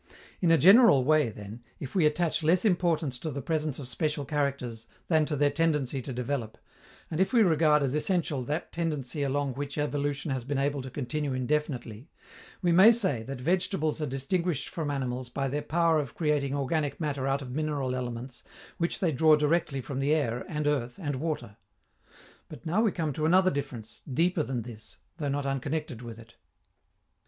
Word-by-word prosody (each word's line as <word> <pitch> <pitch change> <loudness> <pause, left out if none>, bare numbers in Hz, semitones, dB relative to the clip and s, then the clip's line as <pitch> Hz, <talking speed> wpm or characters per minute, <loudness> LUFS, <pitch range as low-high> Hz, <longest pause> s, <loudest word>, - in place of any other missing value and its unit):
In 175 - +3
a 165 - +6
general 190 - +7
way, 150 -1 +3
then, 105 +2 -9 0.2
if 135 - -7
we 175 -6 +4
attach 160 +1 0
less 170 +6 +2
importance 170 - +1
to 160 - -4
the 140 -1 -4
presence 155 -2 -1
of 140 - -7
special 150 +2 -2
characters 135 -6 -2 0.2
than 160 -3 +4
to 150 - -1
their 145 0 +2
tendency 145 -4 0
to 130 - -6
develop, 125 -2 -3 0.5
and 160 - -2
if 190 - +2
we 235 -3 +5
regard 155 -4 +4
as 135 -1 0
essential 150 -4 0
that 150 +5 -3
tendency 150 -4 -3
along 140 -1 0
which 140 +2 -5
evolution 145 0 -1
has 130 -2 -2
been 140 +2 -2
able 140 0 0
to 130 - -7
continue 145 +2 -3
indefinitely, 130 -2 -2 0.5
we 175 - +3
may 190 +7 +8
say 190 - 0
that 135 +3 -6
vegetables 165 +1 0
are 150 - -1
distinguished 150 +4 -1
from 160 -5 -3
animals 130 -3 -3
by 135 +2 -2
their 145 +3 -2
power 165 0 +2
of 140 -5 -5
creating 145 -3 0
organic 145 0 -1
matter 140 -4 -2
out 135 +1 0
of 125 - -8
mineral 145 -2 -1
elements 125 0 -5 0.4
which 170 0 -1
they 175 -4 +2
draw 155 +3 +5
directly 150 -2 +1
from 135 +1 -5
the 145 +3 +2
air 120 -6 -1
and 150 -3 -2
earth 135 -5 0
and 145 -6 -2
water. 130 -8 -4 0.9
But 150 -7 -11
now 175 +7 +2
we 225 -3 +3
come 160 -5 -2
to 155 +3 0
another 185 +2 +5
difference, 130 -6 -6
deeper 170 +5 +2
than 125 -5 -3
this, 110 -2 -10 0.2
though 145 -4 -2
not 140 0 -1
unconnected 135 -1 -3
with 115 -2 -8
it. 115 +1 -15
145 Hz, 185 wpm, -28 LUFS, 130-160 Hz, 0.9 s, may